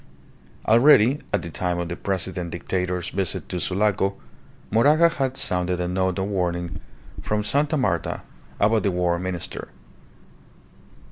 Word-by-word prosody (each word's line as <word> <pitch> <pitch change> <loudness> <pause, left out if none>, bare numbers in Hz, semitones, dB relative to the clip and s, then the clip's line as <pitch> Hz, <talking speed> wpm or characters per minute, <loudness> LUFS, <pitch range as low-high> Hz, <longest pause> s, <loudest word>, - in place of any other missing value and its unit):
Already, 120 +2 +6
at - - 0
the 85 - -6
time 90 +1 -1
of 85 0 -2
the 85 - -4
President 95 -2 -3
Dictator's 90 0 -2
visit 95 -2 -3
to 90 - -3
Sulaco, 100 +2 +1 0.6
Moraga 150 +10 +5
had 135 -5 -2
sounded 90 -1 +1
a 90 - -1
note 95 +1 0
of 95 - 0
warning 90 -3 -2 0.4
from 105 0 -1
Sta. 145 +7 +1
Marta 95 -11 -1 0.4
about 110 +2 +3
the 100 - +1
War 90 -1 0
Minister. 90 -1 -4
95 Hz, 135 wpm, -24 LUFS, 90-110 Hz, 0.6 s, Already